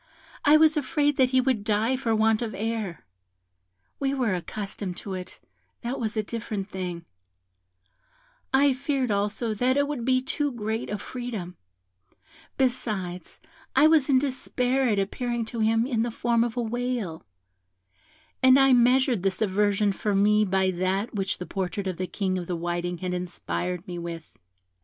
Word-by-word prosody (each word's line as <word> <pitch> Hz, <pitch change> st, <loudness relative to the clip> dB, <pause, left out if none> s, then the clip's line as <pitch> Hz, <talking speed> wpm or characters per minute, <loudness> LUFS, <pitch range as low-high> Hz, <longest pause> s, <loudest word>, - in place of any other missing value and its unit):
I 295 Hz, +1 st, +7 dB
was 315 Hz, 0 st, +5 dB
afraid 290 Hz, 0 st, +1 dB
that 260 Hz, -1 st, +4 dB
he 260 Hz, 0 st, +3 dB
would 255 Hz, -5 st, +1 dB
die 220 Hz, +4 st, +1 dB
for 240 Hz, -4 st, 0 dB
want 220 Hz, 0 st, +3 dB
of 230 Hz, -2 st, -3 dB
air; 215 Hz, -, -3 dB, 0.9 s
we 275 Hz, 0 st, 0 dB
were 245 Hz, -7 st, +1 dB
accustomed 195 Hz, 0 st, -4 dB
to 195 Hz, -, -6 dB
it, 185 Hz, -1 st, -7 dB, 0.4 s
that 240 Hz, +3 st, -3 dB
was 225 Hz, -1 st, -2 dB
a 215 Hz, -, +1 dB
different 210 Hz, -2 st, -5 dB
thing; 180 Hz, -3 st, -5 dB, 1.5 s
I 275 Hz, +1 st, +4 dB
feared 270 Hz, -2 st, -1 dB
also 205 Hz, +3 st, 0 dB
that 250 Hz, +5 st, +1 dB
it 285 Hz, 0 st, +2 dB
would 285 Hz, -5 st, -3 dB
be 255 Hz, +1 st, +3 dB
too 290 Hz, +2 st, -1 dB
great 220 Hz, 0 st, -3 dB
a 210 Hz, -, -2 dB
freedom; 220 Hz, -8 st, -6 dB, 1.0 s
besides, 210 Hz, -9 st, -2 dB, 0.4 s
I -, -, +6 dB
was 310 Hz, -3 st, +5 dB
in 270 Hz, -, +5 dB
despair 260 Hz, -1 st, 0 dB
at 210 Hz, -, +1 dB
appearing 235 Hz, +4 st, -1 dB
to 235 Hz, -, -3 dB
him 225 Hz, +1 st, +3 dB
in 240 Hz, -4 st, 0 dB
the 240 Hz, -, 0 dB
form 235 Hz, 0 st, +1 dB
of 240 Hz, 0 st, -3 dB
a 240 Hz, -, +1 dB
whale, 235 Hz, -7 st, -3 dB, 1.2 s
and 260 Hz, 0 st, +7 dB
I 270 Hz, -1 st, +6 dB
measured 250 Hz, -3 st, +4 dB
his 190 Hz, -1 st, 0 dB
aversion 205 Hz, 0 st, +2 dB
for 205 Hz, +1 st, -1 dB
me 210 Hz, +2 st, +4 dB
by 190 Hz, -1 st, +2 dB
that 185 Hz, +4 st, -1 dB
which 195 Hz, -2 st, -1 dB
the 180 Hz, -, -6 dB
portrait 190 Hz, +1 st, -3 dB
of 185 Hz, -3 st, -3 dB
the 185 Hz, -, -2 dB
King 185 Hz, -2 st, -1 dB
of 175 Hz, -, -6 dB
the 180 Hz, -, -2 dB
Whiting 175 Hz, +1 st, -2 dB
had 180 Hz, +1 st, -3 dB
inspired 180 Hz, 0 st, -3 dB
me 175 Hz, -1 st, -5 dB
with. 170 Hz, -2 st, -7 dB
220 Hz, 165 wpm, -26 LUFS, 190-255 Hz, 1.5 s, I